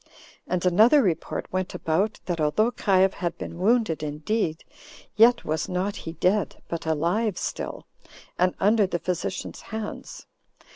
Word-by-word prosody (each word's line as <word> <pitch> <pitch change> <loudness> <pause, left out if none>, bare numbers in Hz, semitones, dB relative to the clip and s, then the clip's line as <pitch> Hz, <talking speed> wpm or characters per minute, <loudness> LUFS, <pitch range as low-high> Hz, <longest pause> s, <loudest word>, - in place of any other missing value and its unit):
And 180 0 -1
another 220 - +6
report 175 -6 -1
went 185 0 -2
about, 190 +7 0
that 170 -3 -2
although 215 +10 +2
Caius 190 -4 +3
had 175 -2 -3
been 170 - -7
wounded 215 -5 +2
indeed, 155 +3 -2 0.5
yet 235 +2 +5
was 155 0 -2
not 185 +3 -1
he 165 - -7
dead, 195 +4 +1
but 165 -1 -5
alive 175 +6 0
still, - - -4 0.5
and 180 0 +2
under 210 0 +4
the 175 - -1
physician's 180 +1 -4
hands. 220 -1 -7
185 Hz, 140 wpm, -25 LUFS, 170-215 Hz, 0.5 s, another